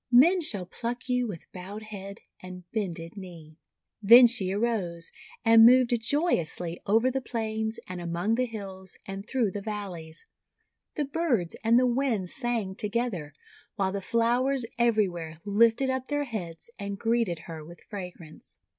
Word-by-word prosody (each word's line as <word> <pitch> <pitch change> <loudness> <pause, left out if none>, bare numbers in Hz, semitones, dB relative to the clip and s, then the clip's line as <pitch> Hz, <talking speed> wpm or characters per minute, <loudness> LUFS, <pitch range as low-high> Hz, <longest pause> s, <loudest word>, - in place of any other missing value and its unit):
Men 335 +10 +6
shall 205 - +1
pluck 240 +7 -5
you 250 -1 +1
with 180 -7 -7
bowed 195 +4 -8
head 200 -1 -9 0.2
and 185 0 -9
bended 175 -6 -4
knee." 170 -5 -11 0.4
Then 235 +4 +9
she 225 -6 +3
arose, 195 -6 -1 0.3
and 225 0 +8
moved 245 +1 +6
joyously 180 - 0
over 225 +5 +3
the 265 +1 -2
plains, 220 -2 -3
and 180 -1 -6
among 175 +5 -1
the 250 +2 +1
hills, 190 -4 -7
and 195 -1 -6
through 235 -2 0
the 205 - -5
val 205 -1 -4
leys. 160 -1 -10 0.7
The 295 - -1
birds 270 - 0
and 230 +1 +5
the 255 - +3
winds 240 -7 0
sang 235 -7 -2
together, 210 -7 -3 0.4
while 190 -1 0
the 200 0 -3
flowers 240 +4 +1
everywhere 180 -9 +1
lifted 230 +5 +3
up 260 0 -3
their 290 0 0
heads 205 - -6
and 200 -1 -4
greeted 225 -5 0
her 160 -2 -8
with 170 +2 -13
fragrance. 180 -6 -10
215 Hz, 155 wpm, -27 LUFS, 180-240 Hz, 0.7 s, Then